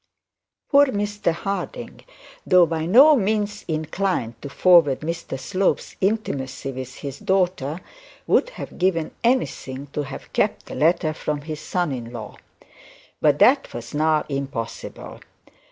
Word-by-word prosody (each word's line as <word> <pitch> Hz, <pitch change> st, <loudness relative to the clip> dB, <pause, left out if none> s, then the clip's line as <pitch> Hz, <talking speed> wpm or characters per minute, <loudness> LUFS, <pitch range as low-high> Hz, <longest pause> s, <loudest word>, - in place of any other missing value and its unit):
Poor 285 Hz, 0 st, +7 dB
Mr 205 Hz, -5 st, -1 dB
Harding, 195 Hz, +4 st, -5 dB, 0.4 s
though 180 Hz, -1 st, +6 dB
by 160 Hz, -1 st, -2 dB
no 275 Hz, -, +8 dB
means 205 Hz, -2 st, -1 dB
inclined 160 Hz, -, -2 dB
to 140 Hz, -, -6 dB
forward 165 Hz, -3 st, +4 dB
Mr 165 Hz, -4 st, -4 dB
Slope's 190 Hz, +7 st, -1 dB
intimacy 140 Hz, -, -2 dB
with 130 Hz, -1 st, -7 dB
his 140 Hz, -1 st, -7 dB
daughter, 180 Hz, -4 st, 0 dB, 0.4 s
would -, -, +3 dB
have -, -, -9 dB
given 175 Hz, -3 st, +1 dB
anything 145 Hz, -, 0 dB
to 150 Hz, -, -1 dB
have 135 Hz, -2 st, -8 dB
kept -, -, 0 dB
the -, -, -9 dB
letter 155 Hz, 0 st, +2 dB
from 150 Hz, -1 st, -3 dB
his 155 Hz, 0 st, -6 dB
son 175 Hz, -3 st, -1 dB
in 120 Hz, -3 st, -5 dB
law. 110 Hz, -4 st, -8 dB, 0.8 s
But -, -, +4 dB
that -, -, +4 dB
was 120 Hz, 0 st, -7 dB
now 155 Hz, +1 st, +2 dB
impossible. 135 Hz, -5 st, -5 dB
160 Hz, 135 wpm, -23 LUFS, 135-195 Hz, 0.8 s, no